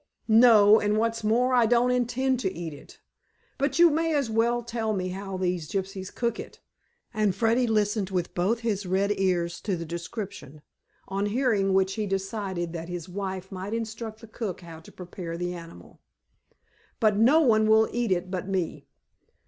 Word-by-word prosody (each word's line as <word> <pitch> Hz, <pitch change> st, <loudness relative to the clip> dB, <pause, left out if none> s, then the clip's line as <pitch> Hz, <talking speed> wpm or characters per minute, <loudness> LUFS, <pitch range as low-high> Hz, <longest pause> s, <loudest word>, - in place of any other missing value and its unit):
"No. 220 Hz, -2 st, +7 dB
And 210 Hz, +1 st, 0 dB
what's 230 Hz, 0 st, 0 dB
more, 245 Hz, +4 st, +2 dB
I 240 Hz, -2 st, +4 dB
don't 240 Hz, +2 st, +3 dB
intend 250 Hz, +1 st, 0 dB
to 190 Hz, -7 st, -1 dB
eat 170 Hz, -4 st, -6 dB
it. 140 Hz, -, -14 dB, 0.6 s
But 275 Hz, 0 st, 0 dB
you 340 Hz, -1 st, +7 dB
may 325 Hz, +1 st, 0 dB
as 275 Hz, -6 st, 0 dB
well 235 Hz, +2 st, +1 dB
tell 225 Hz, -2 st, -2 dB
me 185 Hz, -2 st, -2 dB
how 195 Hz, +1 st, -5 dB
these 180 Hz, -4 st, -2 dB
gypsies 190 Hz, -1 st, -4 dB
cook 235 Hz, -1 st, -2 dB
it," -, -, -9 dB, 0.5 s
and 210 Hz, -4 st, +1 dB
Freddy 235 Hz, +2 st, +2 dB
listened 210 Hz, -2 st, 0 dB
with 180 Hz, -2 st, -2 dB
both 205 Hz, +7 st, 0 dB
his 205 Hz, -4 st, -2 dB
red 195 Hz, +3 st, +1 dB
ears 175 Hz, -3 st, 0 dB
to 195 Hz, -4 st, -2 dB
the 165 Hz, -, -5 dB
description, 170 Hz, -, -7 dB, 0.4 s
on 195 Hz, +2 st, -1 dB
hearing 205 Hz, -4 st, +1 dB
which 190 Hz, 0 st, +2 dB
he 215 Hz, -2 st, -3 dB
decided 195 Hz, -3 st, -3 dB
that 165 Hz, 0 st, -6 dB
his 175 Hz, -1 st, -5 dB
wife 190 Hz, 0 st, -5 dB
might 195 Hz, +3 st, -4 dB
instruct 220 Hz, -1 st, -5 dB
the 225 Hz, -, -11 dB
cook 210 Hz, -5 st, -5 dB
how 165 Hz, -2 st, -10 dB
to 160 Hz, -, -15 dB
prepare 175 Hz, -2 st, -7 dB
the 175 Hz, +1 st, -3 dB
animal. 170 Hz, -1 st, -12 dB, 1.0 s
"But 215 Hz, -3 st, +3 dB
no 260 Hz, +9 st, +5 dB
one 220 Hz, -6 st, +4 dB
will 220 Hz, 0 st, +5 dB
eat 240 Hz, -3 st, -1 dB
it 185 Hz, 0 st, -1 dB
but 185 Hz, -1 st, -3 dB
me." 190 Hz, -4 st, -3 dB
205 Hz, 180 wpm, -26 LUFS, 185-230 Hz, 1.0 s, No